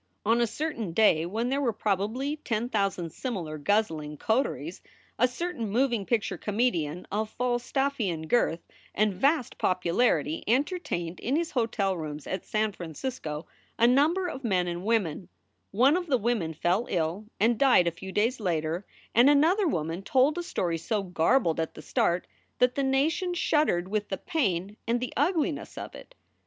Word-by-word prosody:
On 230 +3 +3
a 235 - +3
certain 230 - -3
day 170 -5 +4
when 225 +6 -2
there 275 +2 0
were 250 -4 +2
probably 220 +8 -1
ten 235 -4 -2
thousand 195 -6 -1
similar 170 - -4
guzzling 155 -5 0
coteries, 185 - -1 0.4
a 250 - +5
certain 250 - -4
moving 235 -2 +1
picture 230 -4 0
comedian 185 -7 -1
of 215 +2 -1
Falstaffian 240 - -1
girth 170 -5 +2 0.3
and 210 -1 +2
vast 275 - +1
popularity 175 -3 +1
entertained 240 - -1
in 255 +5 -1
his 335 +1 -1
hotel 225 -6 0
rooms 155 -3 -6
at 190 - -4
San 215 0 0
Francisco 165 - -5 0.3
a 230 - +4
number 305 +9 +3
of 270 -5 -6
men 185 -6 +1
and 175 +2 -4
women; 195 -6 0 0.4
one 255 - +4
of 355 -1 -2
the 270 -4 +3
women 210 -8 -1
fell 180 +9 +1
ill 175 +5 -1
and 225 +2 +3
died 260 -10 +5
a 170 - +1
few 190 +3 -9
days 230 +6 +1
later 170 -1 -1 0.3
and 240 +5 +6
another 335 +8 +4
woman 165 - -2
told 265 +8 +3
a 350 - -2
story 170 - -2
so 210 +3 -1
garbled 175 +1 +2
at 160 - -2
the - - -9
start 175 +1 +1 0.3
that 250 0 +3
the 280 - -1
nation 300 +7 +1
shuddered 300 - +1
with 210 +1 -2
the 190 - -2
pain 205 - -1
and 235 +1 +1
the 250 - -4
ugliness 310 +1 0
of - - -6
it. - - -13
220 Hz, 165 wpm, -28 LUFS, 175-265 Hz, 0.4 s, and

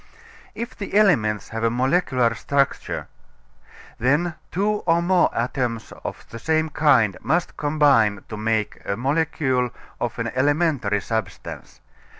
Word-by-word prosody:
If 235 +2 -5
the 200 -1 -6
elements 125 - +3
have 115 0 -4
a 115 - +4
molecular 130 0 +1
Structure 140 -1 -1 0.9
then 145 +8 +2 0.2
two 210 +3 +1
or 165 0 +4
more 180 +1 +3
atoms 120 -1 -2
of - - -7
the 115 - -7
same 160 +3 +1
kind 130 - +3
must 175 +2 0
combine 140 -9 +3
to 110 - -6
make 110 0 -1
a 100 - -2
molecule 135 -2 0 0.3
of 120 -1 -3
an 115 0 -2
elementary 135 -6 +1
substance. 110 -8 -5
130 Hz, 130 wpm, -23 LUFS, 115-160 Hz, 0.9 s, a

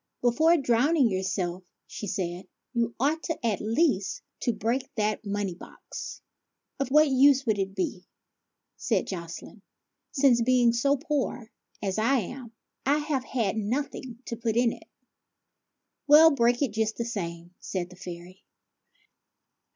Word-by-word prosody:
" - - -54
Before 315 +8 +4
drowning 265 0 +3
yourself," 185 -1 -2 0.2
said 210 - -6
she, 185 -1 -4
" - - -57
you 235 -1 0
ought, 300 +5 +1 0.2
at 220 -4 0
least, 220 - 0 0.2
to 240 - +1
break 230 +4 -1
that 215 -1 0
money 200 -2 -2
box." 170 - -9 0.3
" - - -53
Of 275 - -1
what 305 +3 +6
use 275 0 +5
would 220 -3 +1
that 195 0 -2
be," 185 -1 -3 0.7
said - - 0
Jocelyne, 170 +3 -7 0.5
"since, 265 -4 +4
being 240 -1 +4
so 275 +4 +2
poor 275 -6 -3 0.3
as 195 +1 -1
I 265 +5 +3
am, 245 +3 -8 0.3
I 285 +2 +3
have 295 -4 -2
had 225 -6 -1
nothing 245 +2 -3
to 235 - -4
put 230 -1 -2
into 240 -1 +2
it? - - -19 0.4
" - - -57
" - - -56
Well, 310 +2 +8
break 240 -1 +2
it 265 - 0
just 220 0 -1
the 235 - -2
same," 175 -6 -5
said 180 -2 -4
the - - -12
fairy. 180 +1 -10
230 Hz, 155 wpm, -27 LUFS, 195-270 Hz, 0.7 s, Well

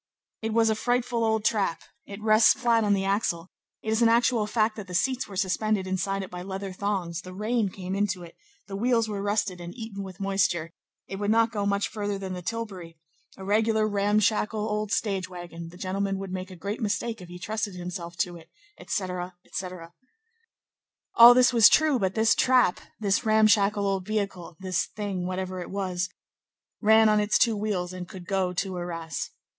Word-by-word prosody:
"It 225 0 -2
was 225 0 +3
a - - +3
frightful 245 +1 0
old 220 -1 +1
trap; 200 -7 +1 0.2
it 200 0 -8
rests 215 +1 +6
flat 235 -3 +2
on 205 -1 +3
the 195 0 -1
axle; 190 -4 -1 0.3
it 220 - -2
is 220 +1 +1
an 230 - +6
actual 230 -2 +3
fact 215 0 +1
that 205 -2 -7
the 180 - -6
seats 260 +7 0
were 200 - -10
suspended 195 +2 0
inside 195 +1 -1
it 185 - -9
by 180 0 -6
leather 190 +1 -5
thongs; 185 -4 -2
the 185 0 -10
rain 215 +1 0
came 185 0 -6
into 195 -2 -1
it; 170 - -12 0.3
the 195 - -7
wheels 230 +1 +2
were 205 -2 -4
rusted 205 -3 -1
and 175 +3 -8
eaten 220 -4 -7
with 190 -2 -9
moisture; 195 -4 0 0.4
it 195 - -6
would 205 +1 -2
not 225 +1 +3
go 205 -2 -1
much 200 0 +1
further 205 -2 -3
than 190 -1 -5
the 180 - -5
tilbury; 190 -5 -5 0.4
a 190 - -8
regular 215 +1 +2
ramshackle 210 +1 +1
old 210 -1 -2
stage 195 -5 -1
wagon; 170 -2 -8
the 175 - -14
gentleman 195 +1 -2
would 195 -1 -6
make 185 0 -5
a 185 - -10
great 200 +7 -5
mistake 220 +1 -2
if 180 - -10
he 175 - -8
trusted 210 +1 -3
himself 175 -1 -6
to 175 0 -1
it," 165 -1 -14 0.3
etc., 180 -2 -3
etc. 180 -2 -7 1.2
All 235 +1 +10
this 250 0 +5
was 230 -2 +8
true; 305 -4 +3
but 190 -1 -1
this 220 0 +4
trap, 250 -8 +3 0.2
this 200 +1 +1
ramshackle 215 -2 +3
old 195 -1 -1
vehicle, 195 -6 -3
this 185 -2 -1
thing, 195 -4 -4
whatever 185 0 -3
it - - -7
was, 185 -2 -2 0.7
ran 220 0 +6
on 210 0 +4
its 210 0 +2
two 235 -3 +3
wheels 200 -4 -2
and 180 -1 -7
could 185 -2 -10
go 190 -1 0
to 185 +1 -3
Arras. 165 -4 -4
200 Hz, 195 wpm, -26 LUFS, 185-220 Hz, 1.2 s, All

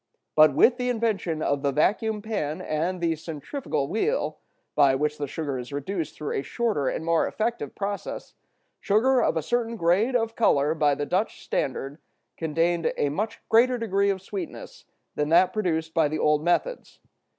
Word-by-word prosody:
But 155 -2 +6
with 240 - +5
the 250 -1 -1
invention 210 -9 -1
of 140 -1 0
the 140 -1 +1
vacuum 210 +8 +1
pan 165 -9 -3
and 170 +4 -2
the 165 -1 +1
centrifugal 155 - -4
wheel, 400 - -1 0.3
by 140 -3 +4
which 150 +2 -1
the 145 - -2
sugar 140 -2 -4
is 125 +2 -8
reduced 160 +4 -4
through 150 - -4
a - - 0
shorter 215 - -1
and 160 - -4
more 165 0 +2
effective 220 - -3
process, 200 0 -5 0.5
sugar 245 +5 +3
of - - +1
a 160 - -1
certain 235 +4 -1
grade 205 +7 +2
of 225 -1 0
color 150 -9 +3
by 150 -3 +2
the 145 - -3
Dutch 185 +7 -1
standard 135 +3 -3 0.4
contained 165 +1 0
a 145 - +1
much 210 +10 -3
greater 245 +3 +4
degree 200 -3 +1
of 190 -1 -2
sweetness 190 -4 -7 0.3
than 150 0 -1
that 175 +3 +5
produced 160 -6 -1
by 160 -2 +3
the 155 +2 -3
old 150 0 +2
methods. 330 - -1
170 Hz, 175 wpm, -25 LUFS, 150-220 Hz, 0.5 s, But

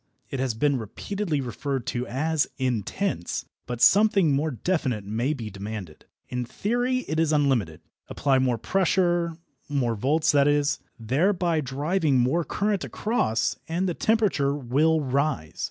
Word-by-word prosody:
It 135 - -3
has 130 -4 -1
been 140 +3 +1
repeatedly 160 - -3
referred 135 +1 -3
to 125 +1 -2
as 155 +4 0
"intense," 125 - -2 0.2
but 120 -1 -4
something 200 -5 +5
more 150 +3 +1
definite 130 - -1
may 115 +7 -1
be 115 -8 -5
demanded. 100 -4 -7 0.2
In 125 0 -3
theory 245 - -1
it 160 - -1
is 160 -1 +2
unlimited. 130 - +1 0.3
Apply 135 -2 +1
more 125 -2 +1
pressure 175 - +1 0.3
more 130 -5 0
volts, 145 +9 +2
that 140 -1 +4
is 145 0 +2 0.2
thereby 165 - +1
driving 145 +2 0
more 130 +8 +2
current 205 +2 -1
across, 210 - 0
and 175 +4 -1
the 175 - 0
temperature 190 -11 +1
will 145 +4 +2
rise. 140 - -1
145 Hz, 140 wpm, -25 LUFS, 125-170 Hz, 0.3 s, something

